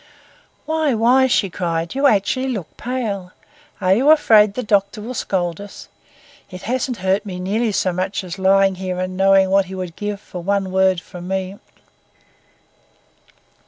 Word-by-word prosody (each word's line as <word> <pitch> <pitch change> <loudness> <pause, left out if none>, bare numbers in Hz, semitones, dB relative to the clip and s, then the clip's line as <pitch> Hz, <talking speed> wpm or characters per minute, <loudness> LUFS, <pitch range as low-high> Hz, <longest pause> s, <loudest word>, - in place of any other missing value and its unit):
"Why, 315 -4 0
why!" 250 +4 +4
she 200 -6 +1
cried. 165 -1 -3
"You 275 +1 +3
actually 255 +4 +1
look 210 -11 -5
pale. 215 -7 -4 0.5
Are 185 +1 +3
you 260 +9 +3
afraid 220 -10 +5
the 250 - -3
doctor 200 -1 +1
will 230 +4 -6
scold 175 -6 -2
us? 205 -1 -11 0.6
It 185 -1 -10
hasn't 250 +1 -2
hurt 190 +2 +2
me 185 -4 -7
nearly 215 +5 -1
so 185 -2 0
much 190 +2 -2
as 185 +1 -7
lying 195 0 +4
here 185 -1 -4
and 185 0 -3
knowing 195 0 +4
what 195 0 +3
he 190 +1 -8
would 180 -3 -6
give 205 -1 -4
for 180 - -9
one 195 +1 -1
word 190 -1 +2
from 180 0 -10
me." 190 +1 -3
195 Hz, 160 wpm, -20 LUFS, 185-225 Hz, 0.6 s, afraid